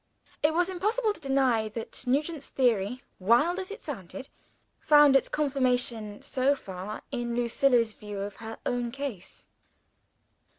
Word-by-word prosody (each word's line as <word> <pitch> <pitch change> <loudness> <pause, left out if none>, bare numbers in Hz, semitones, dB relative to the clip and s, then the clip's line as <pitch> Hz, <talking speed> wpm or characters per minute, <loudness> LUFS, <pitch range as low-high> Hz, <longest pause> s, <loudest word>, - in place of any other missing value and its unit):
It 305 +1 +2
was 350 +1 +3
impossible 420 +5 0
to - - -11
deny 265 -5 +2
that 230 +3 -6
Nugent's 290 +3 0
theory, 245 -1 +1 0.2
wild 240 - +3
as 375 - -5
it 415 +4 -8
sounded, 195 - -7 0.5
found 295 -2 +6
its 270 - +3
confirmation, 250 -7 0
so 270 +2 +1
far, 190 -3 -7
in 240 -2 -2
Lucilla's 240 -1 +2
view 210 -1 -8
of 200 0 -6
her 225 0 -8
own 245 -1 -1
case. 260 -7 -7
255 Hz, 135 wpm, -28 LUFS, 225-295 Hz, 0.5 s, found